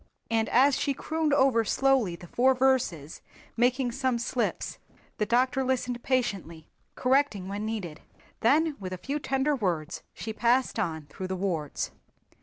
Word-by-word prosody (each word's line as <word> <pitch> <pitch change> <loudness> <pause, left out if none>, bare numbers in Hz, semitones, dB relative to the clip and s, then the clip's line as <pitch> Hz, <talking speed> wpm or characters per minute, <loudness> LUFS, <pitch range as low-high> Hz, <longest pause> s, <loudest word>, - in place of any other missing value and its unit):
And 225 -1 +1
as 270 +3 +4
she 280 - 0
crooned 315 +1 -1
over 265 -5 +4
slowly 255 -5 +2
the 175 - -12
four 260 +8 +3
verses 250 - 0 0.3
making 245 +1 +2
some 260 0 0
slips 240 +1 -2 0.4
the 210 - +1
doctor 255 +3 +2
listened 250 -2 -1
patiently, 195 - -2 0.3
correcting 255 -7 +1
when 205 +2 -3
needed. 190 -9 -5 0.4
Then 300 +6 +3
with 185 -2 -5
a - - -4
few 280 +11 -3
tender 275 +1 0
words 175 - -2
she 220 - -5
passed 240 +1 +2
on 160 -7 -2
through 185 +6 -7
the 190 - -2
wards. 175 -6 -2
240 Hz, 150 wpm, -28 LUFS, 190-265 Hz, 0.4 s, as